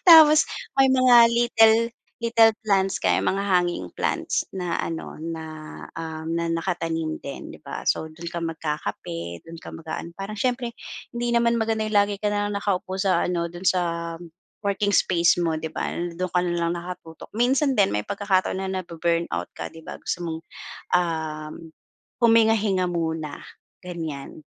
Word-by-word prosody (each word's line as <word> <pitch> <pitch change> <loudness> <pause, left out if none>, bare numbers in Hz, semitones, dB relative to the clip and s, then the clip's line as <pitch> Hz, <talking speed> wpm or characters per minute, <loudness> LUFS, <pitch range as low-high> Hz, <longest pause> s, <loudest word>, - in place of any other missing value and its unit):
Tapos 310 -2 +10 0.3
may 270 -1 +5
mga 255 -2 +6
little 225 -2 +5 0.5
little 230 -1 +5
plants 195 -2 +1
kami, - - +3
mga 195 +1 0
hanging 175 - +1
plants - - 0
na 180 -3 -2
ano, 165 -1 -4
na, 160 0 -5 0.6
um, 160 -1 -5
na 170 - -1
nakatanim 165 -2 -2
din, 140 - -7
'di - - -11
ba. - - -5
So, - - +1
dun 170 +1 -7
ka 170 - -4
magkakape, 150 - -4
dun 165 0 -10
ka - - -9
mag-aano, 165 +1 -6
parang 200 +2 -5
siyempre 245 +1 0 0.4
hindi 240 0 -1
naman 235 0 +3
maganda 220 -1 0
yung 215 - -4
lagi 205 0 +2
ka 210 - -2
na 205 0 0
lang 205 - -3
nakaupo 190 -2 -1
sa 190 -1 +2
ano, 170 -1 -1
do'n 175 +2 -7
sa 185 -1 +4 0.8
working 200 0 +1
space 175 0 +3
mo, 160 -2 0
'di 160 - -4
ba, - - -2 0.2
do'n 185 +1 -3
ka 180 - +2
na 175 - 0
lang 170 0 0
nakatutok. 170 -2 -8
Minsan 265 +4 +2
din 200 -5 +4
may 105 0 -2
pagkakataon 200 -2 +1
na 190 0 -3
nabu-burn 170 -2 -1
out - - -3
ka - - -3
'di 165 - -11
ba - - -8
gusto 175 - -3
mong, 160 -2 -3 0.6
um 160 -2 -3 0.5
huminga-hinga 220 -5 +4
muna, 160 -3 -3 0.4
ganyan. 160 -5 -6
180 Hz, 165 wpm, -24 LUFS, 165-215 Hz, 0.8 s, Tapos